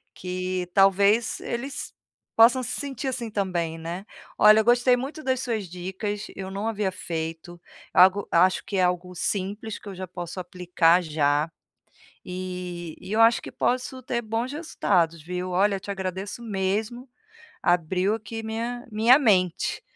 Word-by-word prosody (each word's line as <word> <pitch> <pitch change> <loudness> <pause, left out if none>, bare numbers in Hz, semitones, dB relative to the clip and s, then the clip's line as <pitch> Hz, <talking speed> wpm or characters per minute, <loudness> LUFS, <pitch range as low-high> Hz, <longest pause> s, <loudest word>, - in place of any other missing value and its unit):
que 185 0 -3
talvez 200 +3 +4
eles 265 +4 -5 0.4
possam 235 +3 +6
se - - -3
sentir 275 -2 -4
assim 250 -3 -3
também, 175 -5 -2
né. 170 +4 -6 0.3
Olha 215 +1 +8
eu 220 - +1
gostei 245 +1 +5
muito 290 +5 -6
das 260 -1 0
suas 225 -6 -2
dicas, 190 +4 -4
eu 190 -1 -6
não 200 +3 -3
havia 210 -3 -1
feito, 165 -1 -5 0.3
algo 190 +2 +5
acho 185 +2 +4
que 200 - -3
é - - +3
algo 180 0 -1
simples 205 +4 -2
que - - -14
eu - - -7
já 185 0 -6
posso 175 +1 -7
aplicar 180 -1 +2
já, 150 -1 +1 0.8
e 180 -2 -6
e 195 - -9
eu 220 - +1
acho 230 +1 +5
que - - -9
posso 255 +1 -1
ter 235 -1 -2
bons 230 +3 -2
resultados 175 - 0
viu, 180 +3 -4
olha 195 +3 +3
eu - - -4
te 205 - -10
agradeço 190 +3 -4
mesmo, 215 +4 -2 0.5
abriu 180 +3 +2
aqui 225 +1 -6
minha 230 +2 -4
minha 225 +5 +5
mente, 185 - +1
195 Hz, 155 wpm, -25 LUFS, 180-225 Hz, 0.8 s, Olha